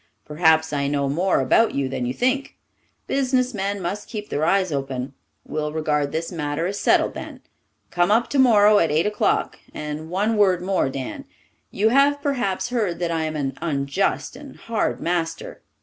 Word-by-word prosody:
Perhaps 160 Hz, 0 st, +2 dB
I 140 Hz, -1 st, 0 dB
know 140 Hz, -1 st, 0 dB
more 175 Hz, +3 st, +1 dB
about 220 Hz, -, +3 dB
you 140 Hz, -1 st, 0 dB
than 130 Hz, -2 st, -3 dB
you 125 Hz, -, -2 dB
think. 260 Hz, +2 st, 0 dB, 0.5 s
Businessmen 250 Hz, -7 st, 0 dB
must 195 Hz, +3 st, -4 dB
keep 210 Hz, -2 st, -6 dB
their 145 Hz, -, -1 dB
eyes 185 Hz, +1 st, +2 dB
open. 135 Hz, -2 st, -3 dB, 0.3 s
We'll 150 Hz, 0 st, -3 dB
regard 150 Hz, -2 st, -1 dB
this 165 Hz, +3 st, -3 dB
matter 150 Hz, -1 st, -2 dB
as 200 Hz, +3 st, -3 dB
settled -, -, +3 dB
then. -, -, -8 dB, 0.5 s
Come 175 Hz, +1 st, +2 dB
up 225 Hz, +3 st, +3 dB
tomorrow 215 Hz, -6 st, +5 dB
at 165 Hz, -, +2 dB
eight 155 Hz, +3 st, +1 dB
o'clock. 395 Hz, -, 0 dB, 0.2 s
And 150 Hz, +1 st, -5 dB
one 210 Hz, +5 st, 0 dB
word 190 Hz, -4 st, +4 dB
more, 185 Hz, -7 st, +1 dB
Dan. 130 Hz, -1 st, -6 dB, 0.4 s
You 215 Hz, +3 st, +1 dB
have 280 Hz, +3 st, +4 dB
perhaps 245 Hz, -8 st, -1 dB
heard 215 Hz, -8 st, -1 dB
that 170 Hz, -1 st, -2 dB
I 160 Hz, -1 st, -1 dB
am 155 Hz, 0 st, -4 dB
an 135 Hz, -3 st, -2 dB
unjust 145 Hz, +4 st, -1 dB
and 285 Hz, -2 st, -11 dB
hard 230 Hz, -1 st, -2 dB
master. 175 Hz, -, -3 dB
175 Hz, 170 wpm, -22 LUFS, 150-215 Hz, 0.5 s, tomorrow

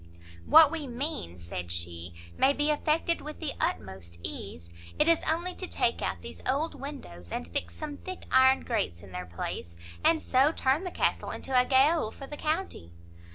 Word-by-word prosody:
"What 315 Hz, -2 st, +8 dB
we 315 Hz, -4 st, -3 dB
mean," 245 Hz, -, -4 dB
said 85 Hz, 0 st, -6 dB
she, 85 Hz, 0 st, -5 dB, 0.2 s
"may 270 Hz, +1 st, +4 dB
be 295 Hz, +1 st, +1 dB
effected 315 Hz, +3 st, +1 dB
with 300 Hz, +1 st, -8 dB
the 315 Hz, -4 st, -2 dB
utmost 95 Hz, -3 st, -3 dB
ease; 90 Hz, -4 st, -6 dB, 0.3 s
it 300 Hz, -, +3 dB
is 335 Hz, -1 st, +5 dB
only 345 Hz, +3 st, 0 dB
to 370 Hz, -, -4 dB
take -, -, +1 dB
out -, -, -2 dB
these -, -, -9 dB
old 295 Hz, +5 st, +1 dB
windows, 90 Hz, -, -8 dB
and 80 Hz, -, -3 dB
fix 85 Hz, 0 st, -3 dB
some 295 Hz, -2 st, -6 dB
thick 370 Hz, -1 st, -7 dB
iron 260 Hz, 0 st, +6 dB
grates 195 Hz, -, -2 dB
in 95 Hz, -, -12 dB
their 90 Hz, 0 st, -5 dB
place, 85 Hz, -1 st, -5 dB, 0.3 s
and 325 Hz, -1 st, +5 dB
so 270 Hz, +1 st, +3 dB
turn 275 Hz, +7 st, +1 dB
the -, -, -2 dB
castle -, -, 0 dB
into 265 Hz, -, -4 dB
a 250 Hz, 0 st, +6 dB
gaol 275 Hz, 0 st, +4 dB
for 275 Hz, -, -10 dB
the 295 Hz, -, -7 dB
county." 310 Hz, -, -2 dB
265 Hz, 185 wpm, -29 LUFS, -, 0.3 s, What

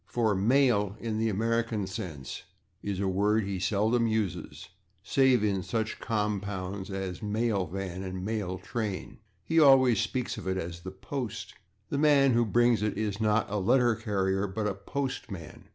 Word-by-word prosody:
for 115 Hz, -3 st, +1 dB
/mail/, 105 Hz, -1 st, +3 dB
in 110 Hz, -2 st, -3 dB
the 110 Hz, 0 st, +1 dB
American 115 Hz, 0 st, 0 dB
sense, 80 Hz, -7 st, -6 dB, 0.4 s
is 100 Hz, -2 st, -3 dB
a 100 Hz, -, 0 dB
word 105 Hz, +3 st, +2 dB
that -, -, -5 dB
he 95 Hz, -2 st, -3 dB
seldom 110 Hz, +5 st, +2 dB
uses, 110 Hz, -5 st, -3 dB, 0.3 s
save 130 Hz, -3 st, +3 dB
in 100 Hz, -3 st, +1 dB
such 110 Hz, +3 st, -2 dB
compounds 100 Hz, -3 st, -2 dB
as 95 Hz, -2 st, -4 dB
/mail 105 Hz, -4 st, -1 dB
van/ 95 Hz, -1 st, -4 dB
and 95 Hz, -1 st, -5 dB
/mail 100 Hz, -5 st, -2 dB
train/. 110 Hz, -5 st, -4 dB, 0.2 s
He 165 Hz, +11 st, +2 dB
always 130 Hz, -6 st, +6 dB
speaks 125 Hz, -2 st, -2 dB
of -, -, -8 dB
it 95 Hz, 0 st, 0 dB
as 85 Hz, -1 st, -5 dB
/the 95 Hz, +1 st, -10 dB
post/. 130 Hz, -6 st, -5 dB, 0.4 s
The 140 Hz, -, -1 dB
man 145 Hz, -3 st, +5 dB
who 120 Hz, 0 st, +3 dB
brings 120 Hz, 0 st, +3 dB
it 105 Hz, -1 st, -1 dB
is 105 Hz, -1 st, -2 dB
not 110 Hz, 0 st, +2 dB
a 105 Hz, -, -2 dB
/letter 120 Hz, +3 st, +3 dB
carrier/, 95 Hz, -1 st, 0 dB
but 105 Hz, +3 st, -3 dB
a 105 Hz, -, 0 dB
/postman 100 Hz, -, -5 dB
105 Hz, 170 wpm, -29 LUFS, 95-115 Hz, 0.4 s, always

